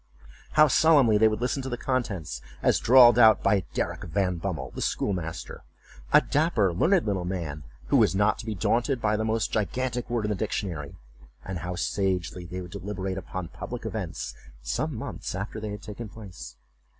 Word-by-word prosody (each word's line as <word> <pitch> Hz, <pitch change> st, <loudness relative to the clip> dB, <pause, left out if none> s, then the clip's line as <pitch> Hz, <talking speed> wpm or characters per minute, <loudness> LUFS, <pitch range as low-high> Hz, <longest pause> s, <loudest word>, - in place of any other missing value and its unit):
How 155 Hz, 0 st, +7 dB
solemnly 140 Hz, -7 st, +5 dB
they 110 Hz, -, +6 dB
would 110 Hz, +1 st, -1 dB
listen 125 Hz, +3 st, 0 dB
to 130 Hz, -, -5 dB
the 120 Hz, -, -3 dB
contents, 105 Hz, -, -2 dB, 0.2 s
as -, -, +3 dB
drawled 120 Hz, -1 st, +7 dB
out 110 Hz, -2 st, +6 dB
by 100 Hz, -1 st, +2 dB
Derrick -, -, -2 dB
Van 90 Hz, +2 st, 0 dB
Bummel, 80 Hz, -7 st, -4 dB
the -, -, -6 dB
schoolmaster, 85 Hz, -4 st, -3 dB, 0.5 s
a 150 Hz, -, +7 dB
dapper 125 Hz, -, +1 dB
learned 170 Hz, -, +3 dB
little 100 Hz, -4 st, -1 dB
man, 85 Hz, -5 st, -4 dB, 0.3 s
who 140 Hz, -, +4 dB
was 110 Hz, -5 st, +4 dB
not 105 Hz, +2 st, +2 dB
to 115 Hz, -, -8 dB
be 110 Hz, -, -2 dB
daunted 120 Hz, -, +1 dB
by 105 Hz, -2 st, +1 dB
the 110 Hz, -, -1 dB
most 110 Hz, 0 st, 0 dB
gigantic 125 Hz, +4 st, -2 dB
word 120 Hz, -3 st, -1 dB
in -, -, -1 dB
the 105 Hz, -, 0 dB
dictionary; 90 Hz, -8 st, -3 dB, 0.5 s
and 95 Hz, -2 st, -4 dB
how 90 Hz, +2 st, -4 dB
sagely 90 Hz, -1 st, -1 dB
they 90 Hz, +2 st, -5 dB
would 90 Hz, -1 st, -9 dB
deliberate 95 Hz, -1 st, -4 dB
upon 95 Hz, -2 st, -6 dB
public 120 Hz, +4 st, -7 dB
events 100 Hz, -7 st, -4 dB, 0.3 s
some 130 Hz, -, -2 dB
months 110 Hz, -, -5 dB
after 100 Hz, +3 st, -4 dB
they 105 Hz, 0 st, -5 dB
had 105 Hz, 0 st, -7 dB
taken 105 Hz, +1 st, -7 dB
place. 100 Hz, -4 st, -10 dB
105 Hz, 185 wpm, -27 LUFS, 90-120 Hz, 0.5 s, How